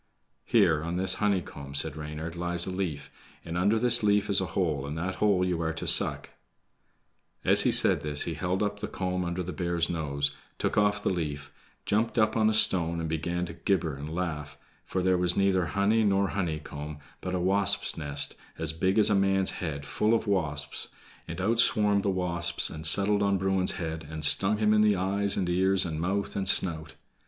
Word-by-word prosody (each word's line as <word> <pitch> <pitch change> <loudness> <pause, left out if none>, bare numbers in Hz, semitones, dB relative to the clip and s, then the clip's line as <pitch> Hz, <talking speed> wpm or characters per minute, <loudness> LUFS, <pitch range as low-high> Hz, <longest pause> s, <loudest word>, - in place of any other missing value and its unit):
"Here, 80 -3 +3
on 85 +2 -4
this 95 0 +2
honeycomb," 90 -9 -2
said 75 0 0
Reynard, 75 +2 -7
"lies 85 0 +2
a 95 - -4
leaf, 90 -6 -4 0.3
and 85 - -6
under 100 +5 +2
this 120 +1 +5
leaf 105 -1 +1
is 95 - +5
a 95 - -2
hole, 75 -7 -1
and 75 +2 -5
that 95 +3 -4
hole 100 -3 +2
you 90 -2 -2
are 80 0 -2
to 80 - -5
suck." - - +2 1.1
As - - +7
he - - +2
said - - +3
this 75 0 0
he 85 - -4
held 90 +5 -2
up 105 0 -3
the 105 - -4
comb 90 -1 -3
under 85 +1 -3
the 90 +1 -6
bear's 85 -1 -1
nose, 70 -3 -1 0.2
took - - -2
off 105 0 +1
the - - 0
leaf, 75 -5 -4 0.3
jumped 115 +4 -1
up 110 -1 +2
on 110 -1 +3
a - - 0
stone, 85 -5 +3
and 80 - -3
began 85 +3 -3
to 85 - -8
gibber 90 -4 -1
and 70 +2 -8
laugh, 75 -4 -4 0.3
for 95 - -2
there 95 -1 +2
was 90 0 +1
neither 95 -2 +2
honey 100 +7 +1
nor 100 -1 +1
honeycomb, 75 -5 -5 0.2
but 95 0 -4
a - - -1
wasp's 100 +2 0
nest, 70 -2 -1 0.2
as 80 -1 -2
big 95 +5 0
as 105 0 +4
a - - +4
man's 95 -1 +2
head, 75 -5 -5
full 105 - +1
of 115 - -2
wasps, 75 -8 -2 0.4
and 85 - -7
out 110 +5 0
swarmed 105 -3 +3
the 100 - -1
wasps 85 -2 0
and 80 0 -1
settled 100 +4 +3
on 100 -1 +1
Bruin's 95 0 0
head, 80 -3 -6
and 80 -1 -2
stung 100 +7 +3
him 105 0 +2
in 105 - +3
his 105 -2 +3
eyes 100 +2 0
and 90 - -1
ears, 95 +2 +4
and 80 -2 -4
mouth 100 +3 -2
and 95 -1 0
snout. 80 -5 0
90 Hz, 205 wpm, -27 LUFS, 80-100 Hz, 1.1 s, As